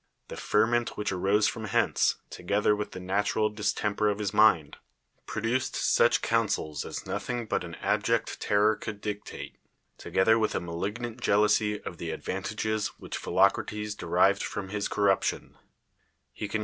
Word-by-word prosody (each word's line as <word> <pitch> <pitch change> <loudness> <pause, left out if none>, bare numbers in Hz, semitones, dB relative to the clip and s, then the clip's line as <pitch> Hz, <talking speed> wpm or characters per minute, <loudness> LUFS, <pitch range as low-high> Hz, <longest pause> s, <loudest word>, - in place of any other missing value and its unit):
The - - -6
ferment 120 +3 +1
which 105 - -1
arose 100 +3 +2
from 110 -2 -3
hence, 100 - +2 0.2
together 100 +3 +1
v,ith 105 0 -5
the - - -6
nat 95 +3 -1
ural 105 0 +2
distemper 105 0 0
of 100 - -1
his 105 -2 -2
mind, 95 -9 +4 0.5
produced 115 +4 -1
such - - +3
counsels 75 -2 0
as - - -6
nothing 120 -1 -3
but - - -1
an 85 -1 -7
abject 105 +3 0
terror 105 +1 +3
could 105 -2 -7
dictate, 105 0 -6 0.4
together 110 +4 +3
with 110 - 0
a - - +1
inaliL^iant 105 +8 -5
jealousy 105 0 +2
of 85 - -7
the 85 - -5
advant;iL'<'S 110 +6 -3
whi^ - - -12
h - - -2
PhilocT - - +3
atcs 105 0 -4
d<'rived 95 +2 +2
fron; 95 -2 -4
his 105 +1 -2
corruj'tio!!. 100 -2 +1 0.8
Tic 105 -1 -5
cDnc'. 110 - 0
105 Hz, 160 wpm, -28 LUFS, 100-110 Hz, 0.8 s, mind